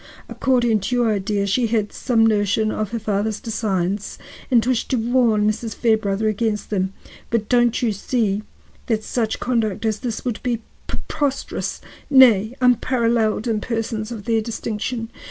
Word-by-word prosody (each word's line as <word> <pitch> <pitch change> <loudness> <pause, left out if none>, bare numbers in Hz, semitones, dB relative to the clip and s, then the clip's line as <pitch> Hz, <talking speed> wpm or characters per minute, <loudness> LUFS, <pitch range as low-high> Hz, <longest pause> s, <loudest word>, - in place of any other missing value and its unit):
According 240 -4 +2
to 205 +6 -2
your 240 -2 +2
idea, 200 0 -1
she 230 +5 +1
had 215 -2 -1
some 230 -3 +2
notion 215 0 +2
of 215 -2 -2
her 235 - -3
father's 210 -1 -1
designs 205 -3 -2 0.3
and 235 -4 +4
wished 250 -2 0
to 265 - +1
warn 230 -3 +2
Mrs. 220 +1 -2
Fairbrother 220 -2 +1
against 215 0 -1
them. 190 -2 0 0.4
But 225 -2 0
don't 240 -1 +2
you 230 - +2
see 210 0 -1 0.5
that 220 -2 0
such 225 -1 -1
conduct 225 -4 -1
as 215 -2 0
this 235 -2 -4
would 240 -3 -2
be 235 -2 -2 0.2
preposterous, 280 -2 -3 0.3
nay, 245 -5 +6
unparalleled 235 -3 +2
in 220 -2 0
persons 225 -1 -3
of 220 -4 -7
their 225 -1 +2
distinction? 225 +1 -4
225 Hz, 155 wpm, -21 LUFS, 210-240 Hz, 0.5 s, nay